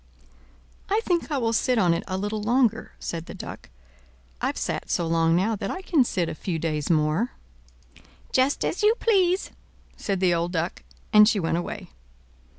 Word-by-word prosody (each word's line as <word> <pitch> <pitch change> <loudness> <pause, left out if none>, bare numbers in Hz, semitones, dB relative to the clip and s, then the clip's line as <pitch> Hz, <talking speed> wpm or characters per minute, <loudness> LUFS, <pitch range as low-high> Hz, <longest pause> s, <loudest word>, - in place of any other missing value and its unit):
"I 415 +3 +3
think 345 -3 0
I 290 - 0
will 230 -3 0
sit 250 +2 +2
on 180 -5 +4
it 170 - -2
a 185 -1 -2
little 205 +2 -2
longer," 230 0 +1
said 165 0 -5
the - - -8
Duck. - - -9 0.7
"I've - - -1
sat - - -3
so 175 - 0
long 165 0 +2
now 205 +6 +1
that - - -4
I 380 - -5
can 315 -8 +3
sit 180 -7 -1
a - - -3
few 170 +1 -3
days 155 -2 -2
more." 155 +8 +1 1.0
"Just 260 +2 +2
as 365 - -2
you 425 +2 +4
please," 380 -6 +2 0.4
said 195 -2 -2
the 180 -2 +3
old 170 +1 -1
Duck; 170 +1 -2 0.3
and 210 0 +8
she 215 - +1
went 165 -1 0
away. 175 - -6
205 Hz, 180 wpm, -25 LUFS, 170-260 Hz, 1.0 s, and